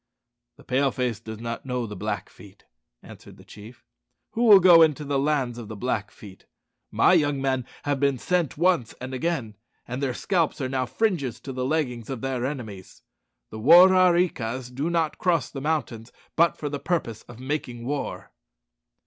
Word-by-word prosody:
"The - - -17
Pale 135 +1 0
face 125 -4 -2
does 110 -1 -9
not 115 0 -5
know 125 -2 -3
the 105 -2 -7
Blackfeet," 100 0 -7 0.4
answered - - -14
the - - -16
chief. 110 +4 -14 0.5
"Who 235 +2 0
will 205 -4 +9
go 175 -2 +7
into 150 -2 +3
the 140 -1 0
lands 135 -4 -1
of 115 - -8
the 110 - -7
Blackfeet? 105 -3 -5 0.4
My - - +3
young 145 -2 +2
men 130 -2 -1 0.2
have 145 -1 -1
been 140 -1 +1
sent 175 +2 -1
once 170 -8 +1
and 130 +1 -7
again, 130 -7 -3 0.3
and 125 +3 -5
their 130 -3 -1
scalps 170 -5 0
are 130 - -2
now 130 -1 -1
fringes 170 - -1
to 135 - -7
the 130 0 -3
leggings 130 -6 -2
of 130 -4 -5
their 130 -1 -2
enemies. 110 -10 -8 0.5
The 110 - -7
War 175 +10 +8
are 185 -1 +5
ree 175 +1 +3
kas 125 +1 -6
do 140 +6 -2
not 165 -2 -1
cross 165 -8 0
the 135 - -6
mountains 125 -7 -3 0.2
but 170 +1 +3
for 150 - -4
the 145 0 -4
purpose 125 -12 -2
of 120 -1 -12
making 130 -3 -4
war." 145 +2 -4
130 Hz, 185 wpm, -25 LUFS, 120-155 Hz, 0.5 s, will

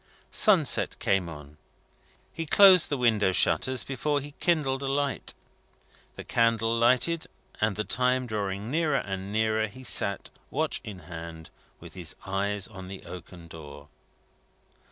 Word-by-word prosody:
Sunset 185 -10 +4
came 95 -3 0
on. 75 -2 -11 0.8
He 165 -1 -5
closed 190 0 +7
the 145 - -1
window 110 -6 +2
shutters 130 +6 +2
before 145 +2 -1
he 145 +1 -9
kindled 145 -6 +1
a 140 - -3
light. 140 0 -2 0.8
The - - -8
candle 115 -1 +1
lighted, 125 +8 +2 0.3
and 105 -2 +1
the 105 - -2
time 125 +2 +1
drawing 105 -1 -4
nearer 155 -2 +1
and 95 -2 -4
nearer, 110 0 +1
he 130 +5 -13
sat, 100 -5 0 0.2
watch - - -1
in 95 -4 -8
hand, 80 0 -9 0.3
with - - -12
his 90 -3 -6
eyes 100 0 -1
on 95 -3 -10
the 95 0 -9
oaken 90 -1 -10
door. 75 -3 -11
110 Hz, 140 wpm, -27 LUFS, 95-135 Hz, 0.8 s, closed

